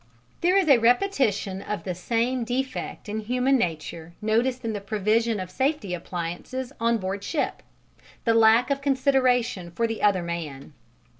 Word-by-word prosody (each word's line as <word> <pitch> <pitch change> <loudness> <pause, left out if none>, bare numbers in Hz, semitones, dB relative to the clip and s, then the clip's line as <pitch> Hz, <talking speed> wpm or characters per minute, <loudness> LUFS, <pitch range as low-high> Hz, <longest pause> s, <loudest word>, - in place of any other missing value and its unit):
This 370 +3 +4
is - - -6
a 275 -5 +7
repetition 230 - +1
of 210 +1 -4
the 185 - -3
same 235 +7 -1
defect 255 0 -3
in 210 +1 -3
human 250 +5 +1
nature 165 -5 -3
noticed 235 +4 0
in 225 - -1
the 205 - -4
provision 215 +2 +1
of 185 -1 -6
safety 260 - -1
appliances 180 +10 -5
on 230 0 +2
board 195 0 -4
ship 305 - -2 0.6
the 230 - +3
lack 225 +3 +5
of 275 0 0
consideration 255 -8 +1
for 230 +7 -1
the 225 -1 -3
other 195 -4 +3
man. 155 -5 -6
225 Hz, 155 wpm, -25 LUFS, 190-255 Hz, 0.6 s, a